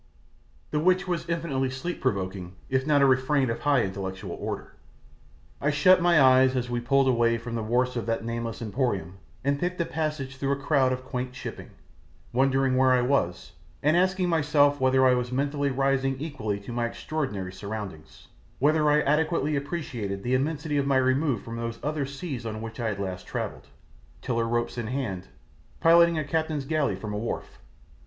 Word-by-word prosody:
the 150 - +1
which 185 +4 +2
was 175 -1 -2
infinitely 150 -6 -1
sleep 130 +7 -5
provoking 95 -6 -2 0.2
if 130 +1 +1
not 145 -2 +4
a - - +7
refrain 130 0 +2
of 115 - -4
a - - -16
high 145 -4 +3
intellectual 95 -1 -5
order. - - -5 0.9
I 140 - +2
shut 175 +5 +5
my 170 -2 +5
eyes 130 -1 +5
as 125 -1 -2
we 120 - 0
pulled 135 +3 +2
away 115 -2 +3
from 115 +1 -7
the 115 - -1
wharfs 125 +3 0
of 120 -1 -3
that 115 0 -1
nameless 115 0 -4
emporium 100 - -2 0.2
and 140 +1 +1
picked 180 +2 -2
a 170 - +1
passage 150 -5 -3
through 140 +1 0
a - - 0
crowd 140 -2 +2
of 130 0 -3
quaint 125 0 -4
shipping, - - -7 0.6
wondering 135 +1 +2
where 130 0 +4
I 125 -1 +3
was, 125 -10 0 0.3
and 150 +3 +4
asking 185 +1 +2
myself 145 -3 +3
whether 130 0 +4
I 130 - +6
was 125 0 -1
mentally 140 +2 0
rising 135 0 0
equal 135 -10 -3
to 100 +4 -8
my 120 0 0
extraordinary 120 -10 -4
surroundings, 100 -6 -8 0.3
whether 150 +2 +3
I 150 0 +4
adequately 150 0 +1
appreciated 125 - -4
the 125 - -1
immensity 150 +2 0
of 140 -1 +1
my 135 -1 +3
remove 130 -1 +1
from 115 0 -6
those 115 0 -4
other 150 -2 -1
seas 140 -3 -6
on 110 -1 -5
which 115 +2 -7
I 115 - -1
had 100 -2 -3
last 95 -2 -5
travelled, - - -5 0.5
tiller 115 -1 -1
ropes 120 +1 -1
in 115 - -3
hand, 110 -8 -3 0.5
piloting 170 0 +5
a 155 - 0
captain's 155 -1 -1
galley 145 - 0
from 105 +2 -6
a 105 - -2
wharf. 115 - -5
130 Hz, 185 wpm, -26 LUFS, 115-150 Hz, 0.9 s, a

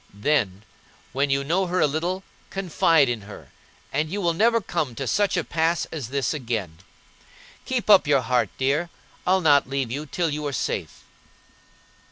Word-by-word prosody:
Then, 105 -5 0 0.5
when 140 +3 +1
you 135 0 +1
know 180 +6 +1
her 180 +1 0
a - - +5
little, 170 +6 -2 0.3
confide 165 -5 +2
in 120 -3 -2
her, - - -12 0.4
and 150 +3 0
you 200 +5 -3
will 170 -3 +1
never 230 +6 +3
come 155 - -3
to 135 - -4
such 205 +9 +1
a - - +1
pass 165 +1 0
as 145 -8 -5
this 135 0 -1
again. 110 - -4 0.9
Keep 255 -3 -2
up 200 -7 +6
your 140 -2 +4
heart, 125 +1 +1
dear; 145 +6 0 0.4
I'll 190 +1 +4
not 145 -5 +4
leave 135 -4 -2
you 145 +4 -4
till 165 +3 -1
you 150 +1 -3
are 140 - -4
safe." - - -3
150 Hz, 175 wpm, -24 LUFS, 130-175 Hz, 0.9 s, up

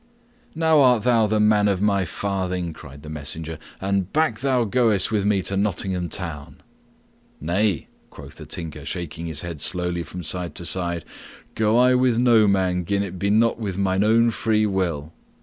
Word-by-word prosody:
"Now 160 -1 +3
art 125 -4 +4
thou 115 -3 +3
the 110 +1 +1
man 105 -1 +4
for 95 - -3
my 100 -2 +2
farthing," 90 -2 -3
cried 70 -1 -13
the 75 - -9
messenger. 80 +2 -5 0.2
"And 95 -1 -1
back 155 -8 +1
thou 130 -2 +1
goest 110 -3 +1
with 105 -2 0
me 100 -2 +2
to 100 - -3
Nottingham 95 -3 -1
Town." 75 -4 -7 0.8
"Nay," 90 +1 0 0.2
quoth - - -12
the - - -10
Tinker, 80 -3 -6
shaking 85 -2 -5
his 80 -3 -2
head 85 -4 -7
slowly 90 -1 0
from 90 +2 -7
side 85 -1 -4
to 85 - -4
side. 85 -1 -2 0.5
"Go 110 +1 +2
I 125 +1 +5
with 125 -2 +2
no 115 -3 +5
man 95 -2 +1
gin 100 +3 0
it 95 -2 -7
be 100 - 0
not 115 +2 +3
with 100 -5 -4
mine 95 0 +1
own 115 +2 +4
free 110 -1 +1
will." 85 -6 -2
95 Hz, 180 wpm, -23 LUFS, 85-110 Hz, 0.8 s, I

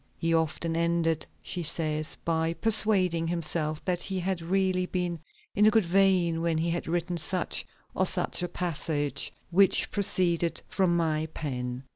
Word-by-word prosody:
"He 165 0 0
often 165 0 0
ended," 165 -2 0 0.2
she 180 - -4
says, 155 -1 -1
"by 165 0 0
persuading 185 -4 +3
himself 160 -2 -2
that 180 -1 0
he 190 +1 -3
had 185 -1 -2
really 185 +1 +1
been 180 -2 -2 0.3
in 210 +1 +4
a - - +8
good 220 -3 +3
vein 180 -2 +3
when 165 -1 0
he 165 +1 0
had 170 - -3
written 175 +1 -1
such 180 +4 -1 0.3
or - - +1
such - - 0
a 175 - -1
passage 150 -5 -2 0.2
which 190 +2 +3
proceeded 175 -4 +1
from 180 -3 +1
my 160 -2 0
pen." 125 -3 -4
170 Hz, 155 wpm, -28 LUFS, 160-185 Hz, 0.3 s, a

